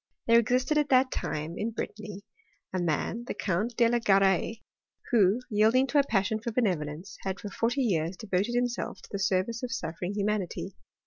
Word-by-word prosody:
There 230 0 +6
existed 255 +5 +2
at 295 -1 0
that 260 0 +4
time 155 +2 -3
in 215 - -1
Brittany 210 -2 -6 0.5
a 185 - 0
man, 175 +8 -1
the - - -3
Count 210 +6 -1
de 235 - +5
la 240 +1 +2
Garaie, 195 0 +2 0.5
who, 210 -1 +4
yielding 220 +5 +4
to 290 +2 +2
a - - +5
passion 220 -3 0
for 235 +2 -4
benevolence, 175 -7 -2
had 190 0 -3
for 205 - -6
forty 235 +6 0
years 175 -6 0
devoted 205 +3 -1
himself 245 -5 -1
to - - -13
the 200 - -3
service 195 +4 0
of 250 -1 -4
suffering 180 -5 -4
hu 200 -1 0
manity. 210 -4 -2
215 Hz, 185 wpm, -28 LUFS, 190-240 Hz, 0.5 s, There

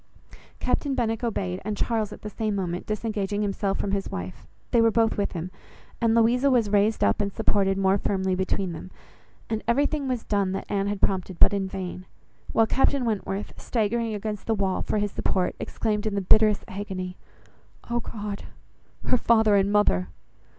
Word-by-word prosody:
Captain 280 -2 0
Benwick 225 -2 -1
obeyed, 190 -5 -2
and 210 +1 -3
Charles 220 -2 0
at - - -10
the 210 - -4
same 215 -1 -1
moment, 180 -2 -3
disengaging 210 -1 -1
himself 200 -1 -1
from 200 - -1
his 195 -1 -1
wife, 90 +1 -6 0.2
they 235 - +5
were 230 - +5
both 225 0 +2
with 200 - -1
him; 175 +1 -4 0.5
and 230 -1 +3
Louisa 240 +4 +4
was 235 -6 +2
raised 210 +2 +3
up 100 - +3
and 200 - -1
supported 195 -1 +1
more 195 +1 +3
firmly 190 -1 0
between 190 0 -1
them, 170 +2 -8 0.6
and 220 -1 -2
everything 285 +3 +1
was 250 -3 -1
done 200 -2 0
that 195 - -3
Anne 200 0 0
had 205 -1 -3
prompted, 185 -2 0
but - - +6
in 195 -1 0
vain; 185 -1 -6 0.4
while 225 - +4
Captain 270 +2 +2
Wentworth, 205 -2 -2
staggering 230 -1 0
against 210 0 -5
the 225 - +2
wall 195 -2 0
for - - -1
his 205 -1 0
support, 185 -2 0
exclaimed 215 -1 -2
in 205 - -2
the 200 - 0
bitterest 215 +2 +4
agony— 190 -2 -5 0.7
"Oh 240 0 0
God! 210 -3 -6 0.6
her 250 - +3
father 220 -3 +4
and 200 0 +3
mother!" 150 - +2
205 Hz, 180 wpm, -26 LUFS, 195-225 Hz, 0.7 s, but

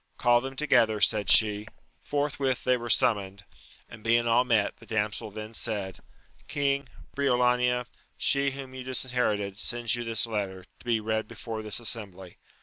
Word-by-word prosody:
Call 120 0 +4
them 135 +1 -6
together, 120 -7 +3
said 105 -2 +1
she. 105 -1 +5 0.3
Forthwith 140 -3 -1
they 130 - +3
were 120 -1 -5
summoned, 100 -3 +1 0.4
and 110 -2 -13
being 120 +1 +3
all 120 +2 +4
met, 115 -5 +1
the - - -16
damsel 105 -1 -2
then 110 +2 -8
said, 100 -5 -3 0.5
King, 140 -1 -1 0.3
Briolania, 125 -2 +2 0.3
she 140 0 +2
whom 135 -1 -8
you 130 -1 -7
disherited, 125 -6 -1
sends 120 0 +1
you 120 - -4
this 115 -1 0
letter, 100 -5 -4
to - - -18
be 115 -2 +2
read 110 0 -2
before 110 0 -6
this 110 +1 -1
assembly. 100 -6 -6
115 Hz, 155 wpm, -28 LUFS, 105-125 Hz, 0.5 s, she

